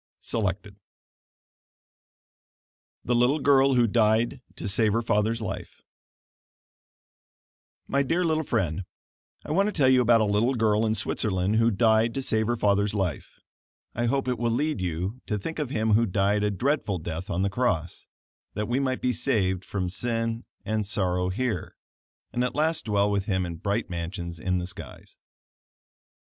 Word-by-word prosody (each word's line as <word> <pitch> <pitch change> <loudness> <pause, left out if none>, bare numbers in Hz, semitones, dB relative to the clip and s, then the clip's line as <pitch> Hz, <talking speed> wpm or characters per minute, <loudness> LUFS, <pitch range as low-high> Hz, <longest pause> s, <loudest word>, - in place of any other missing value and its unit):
Selected 100 -2 -3 2.3
THE 120 - +1
LITTLE 125 +5 +3
GIRL 135 -2 +4
WHO 120 -1 +5
DIED 115 +3 +2
TO - - -5
SAVE 105 +1 +2
HER 115 +1 +1
FATHER'S 110 +1 +1
LIFE 110 - -6 2.1
My 140 - +1
dear 165 +6 +1
little 160 -2 +1
friend: 95 - -1 0.6
I - - -5
want 195 +6 +3
to - - 0
tell 140 -9 +3
you 130 -1 +5
about 120 -1 +5
a - - +3
little 105 +6 +1
girl 110 -1 +2
in 110 - +1
Switzerland 100 -1 0
who 115 +1 +4
died 110 +1 +3
to 135 - -2
save 110 -3 +1
her 120 - +1
father's 100 0 +1
life. 95 -7 -3 0.5
I 120 +1 -1
hope 135 +2 0
it 125 - -1
will 120 0 +1
lead 145 0 0
you 90 +7 -3
to 105 - -1
think 160 +11 -5
of 150 -4 -2
Him 110 -3 +1
who 115 +2 +4
died 100 +2 +1
a 105 - +2
dreadful 110 -1 0
death 85 +3 -6
on 95 0 0
the 100 - +1
cross, 100 -8 -1 0.5
that 105 0 -2
we 125 +3 0
might 130 -2 -1
be 125 - +1
saved 100 -7 0
from 95 -2 -3
sin 115 +4 -2 0.2
and 110 +1 0
sorrow 90 -3 0
here, 105 -2 -2 0.6
and 125 - 0
at 125 - -2
last 155 -1 +1
dwell 105 -1 +2
with 100 -1 0
Him 95 -3 0
in 85 -1 -6
bright 100 +6 -1
mansions 85 -1 -5
in 90 +3 0
the 90 - -2
skies. 85 -7 -11
110 Hz, 165 wpm, -26 LUFS, 95-125 Hz, 2.3 s, WHO